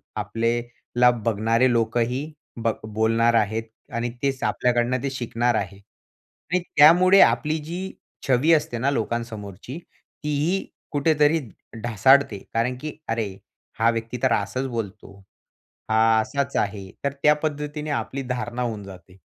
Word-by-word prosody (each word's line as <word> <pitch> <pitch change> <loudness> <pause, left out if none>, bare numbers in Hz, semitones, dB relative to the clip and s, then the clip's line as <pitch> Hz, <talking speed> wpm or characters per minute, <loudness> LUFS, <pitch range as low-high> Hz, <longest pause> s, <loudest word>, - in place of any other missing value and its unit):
आपल्याला 120 +1 0 0.2
बघणारे 115 +3 +2
लोकही 120 +5 0 0.3
ब 115 - +3 0.2
बोलणार 115 +2 +2
आहेत 110 0 +1 0.3
आणि 115 +1 -1
तेच 135 -1 -1
आपल्याकडनं 125 +1 +1
ते 140 - 0
शिकणार 120 -2 0
आहे 100 - -3
आणि 170 - -7 0.2
त्यामुळे 180 +6 +7
आपली 155 +1 +3
जी 180 +5 -5 0.4
छवी 135 +5 +4
असते 150 -6 +1
ना 130 +4 +1
लोकांसमोरची, 115 - -4 0.5
तीही 150 +6 0 0.3
कुठेतरी 150 +1 +3 0.4
ढासाळते 120 +1 +4 0.2
कारण 125 +2 0
की 155 -1 -6
"अरे! 110 -4 -2 0.4
हा 115 +1 +4
व्यक्ती 115 +1 -4
तर 130 -3 +4
असाच 110 +6 -1
बोलतो, 105 -5 -6 0.7
हा 110 0 +4
असाच 140 +5 -3
आहे." 100 -2 -2
तर 140 -1 0
त्या 150 - +7
पद्धतीने 150 0 -3
आपली 130 +1 -3
धारणा 125 -1 -3
होऊन 110 -4 -3
जाते. 95 -1 -13
120 Hz, 125 wpm, -24 LUFS, 115-140 Hz, 0.7 s, त्यामुळे